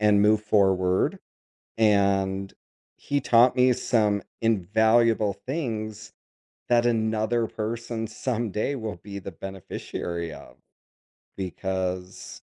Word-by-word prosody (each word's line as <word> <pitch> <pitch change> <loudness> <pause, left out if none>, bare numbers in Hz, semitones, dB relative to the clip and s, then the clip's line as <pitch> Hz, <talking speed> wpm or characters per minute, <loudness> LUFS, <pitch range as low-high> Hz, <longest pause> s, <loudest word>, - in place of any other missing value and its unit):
and 105 -1 +4
move 105 +1 +4
forward, 95 -3 +2 0.6
and 100 -2 +2 0.4
he 145 0 -1
taught 125 0 +5
me 125 0 +5
some 110 -5 +1 0.2
invaluable 110 +1 +3
things 110 -7 -4 0.6
that 120 -1 +4
another 110 0 +1
person 115 +1 -4
someday 115 +2 -2
will 110 -5 -5
be 100 +3 -8
the 100 0 -7
beneficiary 85 -2 -6
of, - - -12 0.8
because 95 -1 -4
110 Hz, 95 wpm, -26 LUFS, 95-115 Hz, 0.8 s, taught